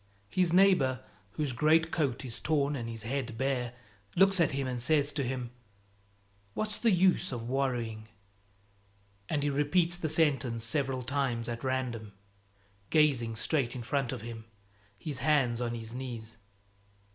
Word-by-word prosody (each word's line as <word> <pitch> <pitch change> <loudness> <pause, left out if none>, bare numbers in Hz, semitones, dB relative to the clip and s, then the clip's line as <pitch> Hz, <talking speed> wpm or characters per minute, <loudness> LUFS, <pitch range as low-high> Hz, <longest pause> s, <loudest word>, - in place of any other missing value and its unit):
His 180 -2 +2
neighbor, 170 -9 +4 0.3
whose 150 -3 -1
greatcoat 155 -1 +2
is 120 -2 -5
torn 145 0 +1
and 115 -4 -4
his 115 -1 -6
head 125 -1 -3
bare, 125 -2 -1 0.4
looks 195 +1 +5
at 165 -5 +3
him 135 0 -1
and 125 -2 -3
says 145 +2 +2
to 145 - -1
him 125 -1 -3 1.0
"What's 215 -1 -1
the 235 - +3
use 185 -2 +3
of 115 -2 -5
worrying?" 120 -5 -2 1.2
And 145 -2 0
he 145 - +1
repeats 165 +5 +2
the 160 -3 -2
sentence 140 -7 +1
several 130 +1 -1
times 120 -3 -1
at 120 +1 -4
random, 125 -5 -2 0.8
gazing 135 -8 +3
straight 130 +1 +1
in 125 - -5
front 135 +1 -1
of 125 -4 -5
him, 115 -1 -8 0.5
his 140 +3 -4
hands 130 -4 +2
on 120 -1 -2
his 115 0 -6
knees. 120 -4 -6
130 Hz, 145 wpm, -30 LUFS, 120-150 Hz, 1.2 s, looks